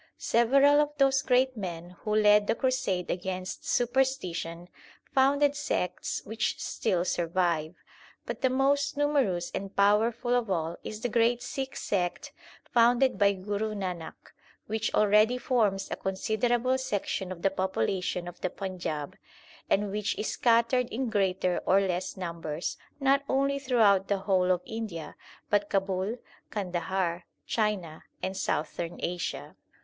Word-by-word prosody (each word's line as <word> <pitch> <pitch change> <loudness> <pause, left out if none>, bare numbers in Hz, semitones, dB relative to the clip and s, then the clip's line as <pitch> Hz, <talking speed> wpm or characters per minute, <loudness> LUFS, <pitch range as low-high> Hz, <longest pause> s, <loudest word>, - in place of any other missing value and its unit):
Several 275 +5 +4
of 295 0 0
those 270 -1 +4
great 255 0 +2
men 175 -4 -6
who 210 -1 -2
led 210 -1 +5
the - - +2
crusade 225 -9 0
against 185 +1 -4
superstition, 230 -10 0 0.5
founded 280 +2 +3
sects 230 -10 -2
which 215 0 -2
still 175 -1 -1
survive; 170 -2 0 0.5
but - - -5
the 260 - +3
most 280 +2 +1
numerous 270 -13 +1
and 195 0 -5
powerful 220 +4 +3
of 245 -3 +1
all 165 -2 -1
is 215 0 -6
the - - 0
great 235 +1 +2
Sikh 265 +2 -4
sect 180 -3 -2 0.4
founded 245 +2 +4
by 200 -1 +5
Guru 205 +3 -3
Nanak, 180 -5 -6 0.3
which 220 +1 -2
already 210 +3 +4
forms 210 -7 +1
a - - 0
considerable 235 +6 0
section 205 -6 -2
of 170 -2 -8
the 195 - +3
population 185 0 -1
of 175 - -10
the 185 - 0
Panjab, 175 -6 -4 0.6
and 205 0 +1
which 210 0 -2
is 215 - -2
scattered 235 +1 +3
in 245 0 -2
greater 185 -3 +1
or 190 - +5
less 185 -2 -2
numbers 170 -3 -4 0.2
not 275 0 +3
only 275 +1 +1
throughout 220 -8 +3
the 200 - +1
whole 190 -2 +1
of 180 -1 0
India 215 -8 -6 0.4
but 205 0 +2
Kabul, 195 +3 -1 0.3
Kandahar, 180 -2 -2 0.2
China, 205 -8 -2 0.2
and 190 +1 -2
Southern 165 -1 -2
Asia. 175 0 -4
205 Hz, 135 wpm, -28 LUFS, 185-245 Hz, 0.6 s, led